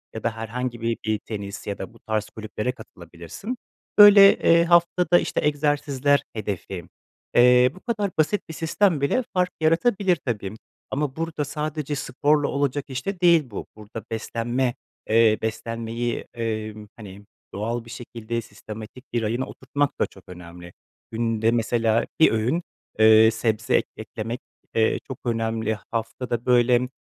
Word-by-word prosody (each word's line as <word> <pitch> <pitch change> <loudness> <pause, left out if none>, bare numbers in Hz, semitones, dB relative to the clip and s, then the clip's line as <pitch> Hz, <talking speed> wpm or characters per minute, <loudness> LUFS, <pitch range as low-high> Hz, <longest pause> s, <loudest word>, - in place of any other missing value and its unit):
ya 110 - -6
da 115 -1 -1
herhangi 120 +1 -4
bir 115 0 -1
bir 110 -1 0
tenis 100 -2 -7
ya 100 - -3
da 95 - -7
bu 115 - -19
tarz 110 -1 -2
kulüplere 110 +2 -4
katılabilirsin. 85 - -9 0.4
Böyle, 205 -1 +9
eee, 170 0 +5
haftada, 175 0 +4
işte, - - -2
egzersizler 145 -1 +1
hedefi, 100 -4 -5 0.5
eee, 125 +1 +6
bu - - -12
kadar 210 -5 -2
basit 160 +7 +2
bir - - -6
sistem 165 0 +1
bile 200 - +1
fark 180 -1 +2
yaratabilir 185 +4 +3
tabii 105 -5 -3 0.4
ama 140 -1 -2
burada 165 -2 -3
sadece 150 0 -3
sporla 145 +2 +1
olacak 140 0 -1
iş 130 0 -5
de 195 -2 -3
değil 170 -3 +6
bu. 100 - -5
Burada 110 +1 -9
beslenme, 120 +3 -1 0.3
eee, 110 -1 +5
beslenmeyi, 115 +1 -3
emm, 110 -2 -4
hani, 100 -2 -11 0.3
doğal 115 +3 -3
bir - - -13
şekilde 115 -1 -5
sistematik 110 +4 -10
bir 120 - +1
rayına 115 +4 -1
oturtmak 145 +2 -2
da - - +3
çok 95 - -16
önemli. 85 -1 -11 0.4
Günde 115 -1 +1
mesela 115 -1 +1
bir 160 - +6
öğün, 120 +10 0 0.4
eee, 110 0 +7
sebze 110 0 0
ek - - +2
eklemek, 115 +3 -5 0.4
eee, 110 0 +2
çok 130 - -7
önemli. 115 -2 -1
Haftada, 115 +1 -3
böyle, 125 0 +3
120 Hz, 145 wpm, -24 LUFS, 110-145 Hz, 0.5 s, Böyle